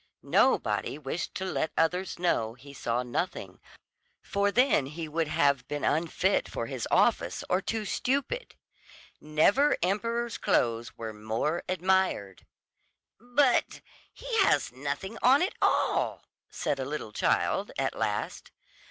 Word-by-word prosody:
Nobody - - +2
wished 150 +3 -4
to 190 - -3
let 160 -4 -1
others 180 +3 0
know 115 -10 0
he 140 +3 -13
saw 120 -2 -1
nothing, 120 -1 -4 0.6
for 200 0 0
then 250 - +3
he 160 +3 -6
would 160 +1 -1
have 140 -3 +2
been 145 0 -4
unfit 170 +5 +1
for - - -3
his - - -4
office - - +2
or 185 +1 +3
too 220 +1 -3
stupid. 280 - -2 0.6
Never 160 - +3
emperor's 230 +5 -1
clothes 115 0 0
were 110 -1 -5
more 110 +10 -2
admired. 185 - 0 0.7
"But 245 +2 +2 0.3
he - - -3
has 390 - +3
nothing 145 - -5
on 265 +6 +5
at 375 - -1
all," - - +1 0.3
said 140 - -2
a 130 - -2
little 145 -6 -5
child - - +1
at - - 0
last. - - -3
170 Hz, 130 wpm, -28 LUFS, 135-220 Hz, 0.7 s, on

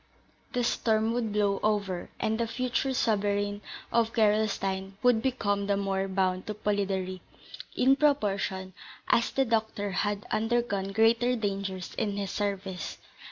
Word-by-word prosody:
The 245 - +1
storm 220 -1 +1
would 235 -3 -1
blow 205 -1 +1
over, 200 -4 0
and 220 +1 0
the 235 - +1
future 255 +3 -1
sovereign 205 -4 0 0.3
of 230 -1 +2
Gerolstein 205 -3 +1
would 245 -3 +4
become 205 -6 0
the 200 -1 +2
more 195 -1 -1
bound 185 -1 0
to 210 - -3
Polidori, 195 -3 -1 0.5
in 265 +2 +5
proportion 200 -10 0 0.4
as 230 - +3
the 270 - +1
doctor 220 -3 -1
had 205 +1 -1
undergone 215 -3 0
greater 230 +4 +3
dangers 195 -4 -3
in 205 -1 -1
his 200 -1 -2
service. 195 -3 -3
205 Hz, 135 wpm, -29 LUFS, 195-225 Hz, 0.5 s, in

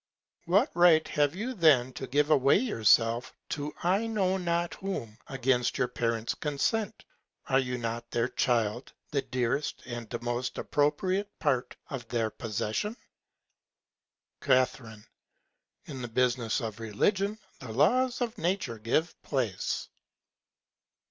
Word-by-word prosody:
What 200 - +3
Right 165 -2 +5
have 145 +1 +1
you 235 +7 -3
then 145 - +4
to 130 - -6
give 145 +4 +2
away 140 -2 +5
yourself 115 - +2
to 145 0 -3
I 195 +6 +2
know 195 -4 +1
not 170 -2 -1
whom, 125 - -5
against 130 -2 +1
your 125 - +1
Parents 115 -2 -1
Consent? 175 +9 -2 0.4
Are 135 - +3
you 125 -1 -2
not 115 0 -4
their 120 0 0
Child, 120 -1 0 0.2
the 140 -2 +1
dearest 125 +3 -2
and 120 -3 -7
most 120 +1 -2
appropriate 185 +8 0
Part 125 -1 0 0.2
of 125 -5 -5
their 115 -2 -1
Possession? 115 - -3 1.4
Ca. 130 0 +4 1.2
In 135 -3 -7
the 120 - -4
Business 120 0 +1
of 110 -1 -5
Religion, 195 - 0 0.2
the 125 -4 -8
Laws 245 - +2
of 235 -1 -2
Nature 175 - -1
give 140 +10 -1
Place. 120 -10 -2
135 Hz, 125 wpm, -29 LUFS, 120-175 Hz, 1.4 s, Right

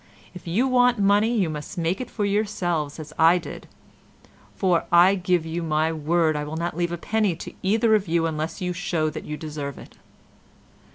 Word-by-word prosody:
If 180 -1 -11
you 215 +11 +1
want 250 -1 +3
money 205 +2 +3
you 190 -5 +2
must 150 +1 -6
make 170 +4 -1
it 255 - -6
for 210 - -2
yourselves 180 -8 -1
as 155 - -9
I 165 +2 +6
did, 170 - -8 0.9
for 180 -4 +1
I 175 +3 +6
give 180 -3 0
you 165 +1 -3
my 160 0 0
word 160 +1 +1
I 150 - -2
will 150 +2 -5
not 170 -1 -3
leave 175 0 -1
a 175 - -3
penny 210 0 0
to - - -9
either 220 +3 +2
of 210 -3 +2
you 165 0 +1
unless 160 +1 -3
you 180 -1 -1
show 170 -3 -1
that 155 - -7
you 150 - -5
deserve 150 -3 -6
it. - - -14
170 Hz, 195 wpm, -24 LUFS, 160-195 Hz, 0.9 s, I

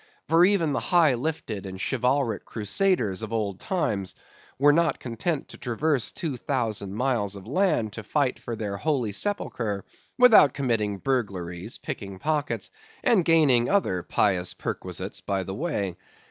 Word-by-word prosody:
For 165 +1 +5
even 180 -6 +3
the - - 0
high 165 -6 +4
lifted 120 -7 -3
and 95 0 -7
chivalric 125 0 0
Crusaders 110 - 0
of 110 -1 -6
old 105 -4 -2
times 105 - -1 0.4
were 145 +2 +5
not 165 0 +2
content 135 +6 -3
to - - -11
traverse 130 +2 0
two 155 -8 -4
thousand 110 -7 -2
miles 115 -5 0
of 95 -2 -10
land 155 - +1
to 110 - -6
fight 135 +4 0
for 120 - -5
their 105 -2 -4
holy 135 -5 0
sepulchre, 110 - -2 0.3
without 225 - +7
committing 115 -7 0
burglaries, 100 -6 -3
picking 100 -2 -6
pockets, 150 - -1 0.3
and 205 -7 +4
gaining 145 -8 +4
other 185 - +1
pious 90 -1 +1
perquisites 95 +1 -4
by 95 0 -1
the 95 - -6
way. 100 - -2
120 Hz, 145 wpm, -26 LUFS, 100-155 Hz, 0.4 s, without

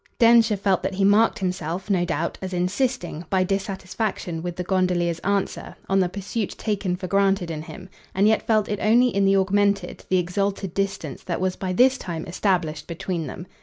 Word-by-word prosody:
Densher 230 -2 +5
felt 195 -1 +1
that 190 +1 -3
he 195 - 0
marked 210 +3 +4
himself, 185 -2 -3
no 185 -4 +2
doubt, 170 -1 -2
as 190 -1 -5
insisting, 185 - -1
by 190 -1 +2
dissatisfaction 190 -2 -3
with 175 0 -4
the 180 - -3
gondolier's 180 -2 +1
answer, 200 +1 -2
on 195 0 +2
the 180 -2 +2
pursuit 200 +2 -4
taken 200 -4 -1
for 185 +1 -6
granted 195 -2 +1
in 155 -1 -4
him; 185 +4 -10 0.3
and 195 +2 +4
yet 220 0 +3
felt 215 -2 +3
it 205 -1 -2
only 240 +4 +4
in 200 -3 +1
the 195 0 +4
augmented, 200 -1 +1
the 185 - +3
exalted 195 +1 -1
distance 195 -8 -3
that 170 - -2
was 185 0 0
by 190 -2 -3
this 255 +7 +4
time 170 -3 -5
established 175 -4 -1
between 170 -1 -3
them. 175 - -7
190 Hz, 190 wpm, -24 LUFS, 180-200 Hz, 0.3 s, Densher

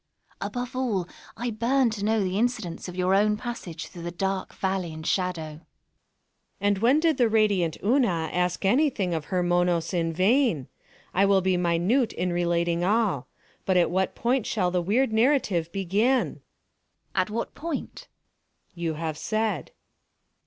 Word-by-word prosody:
Above 245 +1 -4
all, 220 -9 -1 0.3
I 240 +1 -2
burn 235 +3 +2
to 210 -2 -5
know 215 0 +2
the 190 +1 -1
incidents 220 -9 -2
of 180 - -7
your 185 +1 +1
own 210 +2 +3
passage 210 -9 -6
through 175 - -11
the 170 - -4
dark 190 +2 -2
Valley 190 -3 -2
and 160 0 -8
Shadow. 180 -3 0
_ - - -5
Monos._ 150 +1 -13 1.0
And 205 0 +2
when 250 +7 +4
did 320 -3 +2
the 240 -3 +3
radiant 205 -7 +2
Una 205 - +2
ask 180 +2 0
anything 210 - +2
of 160 -2 -2
her 180 -2 0
Monos 175 -1 +1
in 165 -2 0
vain? 190 - +2 0.5
I 195 +2 +4
will 195 -1 +4
be 185 0 +2
minute 180 +8 +1
in 180 0 -1
relating 170 0 +1
all—but 190 - -1
at 175 -2 +3
what 190 +1 0
point 245 0 0
shall 185 -5 0
the 180 0 +1
weird 220 +7 +1
narrative 220 - +2
begin? 205 +8 +1
Una. - - -11 0.7
At 185 +1 +1
what 230 +2 -3
point? 325 -2 -5 0.6
Monos. 170 - -13
You 165 -2 0
have 160 -1 -4
said. 215 - -1
190 Hz, 165 wpm, -26 LUFS, 175-230 Hz, 1.0 s, when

